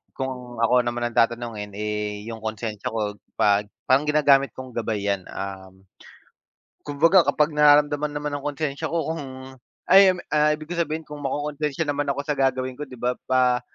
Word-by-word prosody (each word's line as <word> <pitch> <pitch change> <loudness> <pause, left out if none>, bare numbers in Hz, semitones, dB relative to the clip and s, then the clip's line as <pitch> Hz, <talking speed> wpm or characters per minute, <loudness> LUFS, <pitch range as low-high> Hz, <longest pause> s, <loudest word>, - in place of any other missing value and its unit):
kung 125 -2 -5
ako 120 +2 +3
naman 120 0 -1
ang - - -18
tatanungin, 115 -3 0
eh, 105 0 -3
yung 115 -1 -6
konsensya 110 -1 -4
ko 105 -2 -2 0.2
'pag 105 0 +3 0.2
parang 140 +3 +3
ginagamit 140 -2 +4
kong 130 -1 -8
gabay 110 -3 -2
'yan, 100 -2 0
um, 95 -1 -8 1.0
kumbaga 165 +6 +4
kapag 150 +1 +2
nararamdaman 150 0 +4
naman 145 0 -3
ang 140 - -6
konsensya 145 +1 -3
ko 160 -1 -1
kung 160 - -5 0.7
ay, 195 0 +8
um - - -8 0.2
ah, 150 0 +4
ibig 155 0 -11
ko - - -2
sabihin 160 -1 -1
kung 150 0 -8
makokonsensya 150 +2 -2
naman 145 0 -1
ako 140 - -4
sa 150 - 0
gagawin 130 -1 0
ko 150 - -5
'di 125 -3 -12
ba 125 +1 0
pa 125 -1 +3
130 Hz, 175 wpm, -24 LUFS, 115-150 Hz, 1.0 s, ay